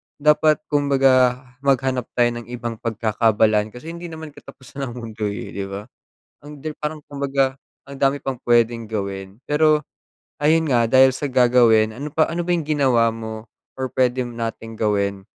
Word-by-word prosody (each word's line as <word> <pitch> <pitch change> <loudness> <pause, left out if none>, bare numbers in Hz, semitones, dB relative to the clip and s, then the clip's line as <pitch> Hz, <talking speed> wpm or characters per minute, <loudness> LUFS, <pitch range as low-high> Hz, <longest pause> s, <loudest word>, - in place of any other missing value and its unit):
dapat 150 +1 +3
kumbaga 135 -3 +3 0.2
maghanap 130 -2 0
tayo 120 -1 +3
ng 120 - -12
ibang 120 -2 -5
pagkakaabalahan 110 -1 +1
kasi 155 +7 -8
hindi 170 +1 -7
naman 160 -2 -9
katapusan 135 -1 -9
ng 120 - -7
mundo 110 -3 -4
eh, 100 0 -5
'di 100 - -4
ba? 100 +1 -6 0.6
Ang 150 -1 -11 0.2
parang 150 0 -4
kumbaga, 140 -1 -1 0.2
ang 140 0 -11
dami 140 +1 +1
pang 135 -3 -3
pwedeng 115 -1 +2
gawin. 100 +1 -5
Pero 150 0 +2 0.6
ayun 160 +2 +3
nga 120 -5 +2
dahil 130 +1 +6
sa 140 +1 -3
gagawin, 120 -4 +4
ano 145 +5 -6
pa 155 +2 +2
ano 170 +1 -3
ba 180 - -4
yung 170 -4 0
ginawa 130 -7 +2
mo 110 0 -7 0.3
or 130 - -1
pwede 125 -1 +1
nating 115 -1 -6
gawin 100 -2 -1
125 Hz, 160 wpm, -21 LUFS, 115-145 Hz, 0.6 s, dahil